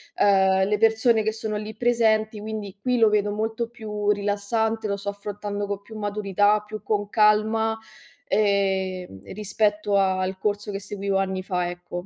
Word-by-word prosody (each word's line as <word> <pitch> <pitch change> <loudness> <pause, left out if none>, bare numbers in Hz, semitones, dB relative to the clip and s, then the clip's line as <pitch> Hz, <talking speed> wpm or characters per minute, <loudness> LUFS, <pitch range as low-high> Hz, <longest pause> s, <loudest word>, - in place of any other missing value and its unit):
uhm, 190 -1 +4
le 210 0 +1
persone 225 0 +4
che 220 0 -1
sono 220 -1 -4
lì 215 +1 -6
presenti, 220 -2 +2
quindi 215 -3 -6
qui 250 +1 +1
lo 225 -2 +5
vedo 210 -1 +1
molto 220 +2 -2
più 210 -3 -4
rilassante, 210 +2 0
lo 200 0 -1
sto 200 0 -4
affrontando 205 0 -5
co 200 - -2
più 220 +2 -13
maturità, 205 0 +1
più 215 0 -7
con 205 -1 -1
calma, 220 +1 +3 0.5
ehm, 190 - 0
rispetto 210 0 0
al 190 -1 +1
corso 205 0 -2
che 195 - -4
seguivo 200 -1 -2
anni 190 -1 -2
fa, 180 -2 -1
ecco. 175 0 -7
205 Hz, 160 wpm, -24 LUFS, 200-220 Hz, 0.5 s, lo